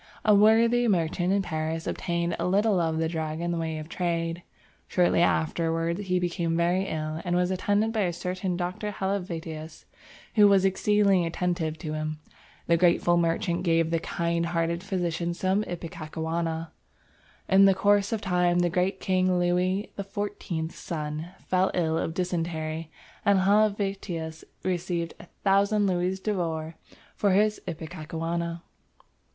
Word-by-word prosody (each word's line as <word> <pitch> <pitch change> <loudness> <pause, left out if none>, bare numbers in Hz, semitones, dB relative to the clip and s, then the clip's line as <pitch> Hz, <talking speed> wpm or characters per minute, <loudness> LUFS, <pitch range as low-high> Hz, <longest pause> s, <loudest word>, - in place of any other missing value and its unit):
A 215 - +6
worthy 230 +3 +5
merchant 175 -2 +1
in 200 0 +2
Paris 160 -1 -3
obtained 170 -1 -1
a - - 0
little 200 +1 +3
of 160 -2 0
the 160 0 +1
drug 160 -1 -3
in 170 0 -1
the 170 - -1
way 160 -1 -2
of 155 0 -6
trade. 170 -1 -2 0.5
Shortly 175 -2 +3
afterwards 165 +3 0
he 180 0 +2
became 170 -2 -1
very 175 +3 +2
ill 155 0 -3
and 175 0 0
was 180 +1 +2
attended 205 +4 +1
by 220 - -1
a 175 - 0
certain 180 +1 -3
Dr. 180 +4 -3
Helvetius, 170 -5 -4 0.5
who 210 -2 +7
was 195 -1 +4
exceedingly 195 -1 +3
attentive 165 -2 -1
to 155 -1 -5
him. 155 0 -3 0.5
The 170 - +3
grateful 175 0 +3
merchant 170 +1 +1
gave 165 -2 +2
the 165 - +2
kind 170 0 -1
hearted 170 0 -1
physician 175 -3 -2
some 190 +3 +1
ipecacuanha. 165 -1 -4 0.8
In 195 +1 +6
the 195 -1 +5
course 200 +1 +3
of 225 -2 -1
time 180 -2 +2
the 175 -1 +2
great 185 +2 0
King 185 -1 +1
Louis 180 +3 0
XIV's 195 -4 -4
son 155 0 -5 0.2
fell 185 +1 +2
ill 160 -3 +1
of 160 - -3
dysentery, 165 -3 -2 0.3
and 200 -2 +4
Helvetius 195 -5 0 0.2
received 175 -2 -2 0.3
1000 200 +1 +3
louis 185 0 0
d'or 165 -6 -2 0.4
for 200 -2 +2
his 210 +2 +2
ipecacuanha. 165 +1 -4
175 Hz, 145 wpm, -27 LUFS, 165-190 Hz, 0.8 s, who